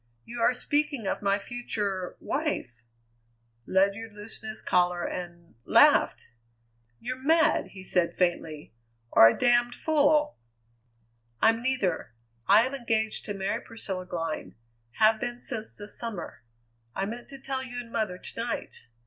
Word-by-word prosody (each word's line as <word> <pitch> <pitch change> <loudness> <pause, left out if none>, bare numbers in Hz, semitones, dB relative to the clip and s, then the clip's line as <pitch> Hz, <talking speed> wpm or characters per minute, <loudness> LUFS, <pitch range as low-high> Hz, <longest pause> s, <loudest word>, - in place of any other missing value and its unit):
"You 235 0 -6
are 245 - +4
speaking 290 -3 -1
of - - -2
my 200 0 +2
future 205 -5 -4
wife!" 270 - -3 0.9
Ledyard 200 +3 +1
loosened 215 +1 -6
his 215 - -5
collar 180 -1 +2
and 175 -1 -7
laughed! - - +4 0.7
"You're 255 +2 -5
mad!" 320 +2 +3
he 190 -1 -10
said 180 -2 +1
faintly, 160 -6 -1 0.4
"or 115 - +9
a 115 - +2
damned 240 0 +3
fool!" 300 -1 +2 1.0
"I'm 225 +1 +3
neither. 205 - -1 0.3
I 210 +4 +6
am 260 - -4
engaged 225 -4 -1
to 205 - -4
marry 195 +4 -2
Priscilla 190 -5 -5
Glynn; 165 -3 -4 0.4
have 220 0 +4
been 240 +1 -3
since 235 -3 -1
the 205 - -7
summer. 220 - -3 0.5
I 195 - -1
meant 235 +4 -7
to 275 - -8
tell 265 0 -3
you 250 -2 -7
and 235 -1 -9
mother 215 -6 -1
to 185 - -9
night. 235 - -5
220 Hz, 140 wpm, -28 LUFS, 185-245 Hz, 1.0 s, or